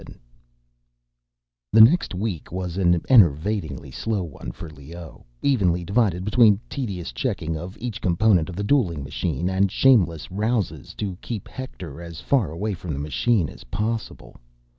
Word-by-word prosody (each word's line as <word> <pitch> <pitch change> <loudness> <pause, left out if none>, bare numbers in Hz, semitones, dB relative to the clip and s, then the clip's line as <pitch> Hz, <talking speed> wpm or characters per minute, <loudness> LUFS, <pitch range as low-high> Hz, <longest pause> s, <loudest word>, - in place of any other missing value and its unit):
VII - - -13 1.5
The 110 - +8
next 120 - +5
week 90 -6 -4
was 90 -1 -4
an 90 -3 +2
enervatingly 80 - +3
slow 105 - -2
one 70 -7 -7
for 85 - -9
Leoh, 80 +3 -11 0.2
evenly 90 -10 +2
divided 100 -3 +1
between 105 -2 +5
tedious 95 - -4
checking 80 +6 -2
of 90 +5 -7
each 115 -2 -5
component 90 -2 +3
of 90 - -7
the 100 - -3
dueling 100 - +1
machine, 75 +3 -2
and 95 +1 +1
shameless 95 - +3
ruses 100 - -2
to 95 -4 -4
keep 110 -5 -5
Hector 90 - -8
as 85 -1 -8
far 125 - +1
away 100 +7 -3
from 85 -3 -5
the 70 - -4
machine 85 +6 +1
as - - -12
possible. 110 - -4
90 Hz, 150 wpm, -23 LUFS, 80-110 Hz, 1.5 s, The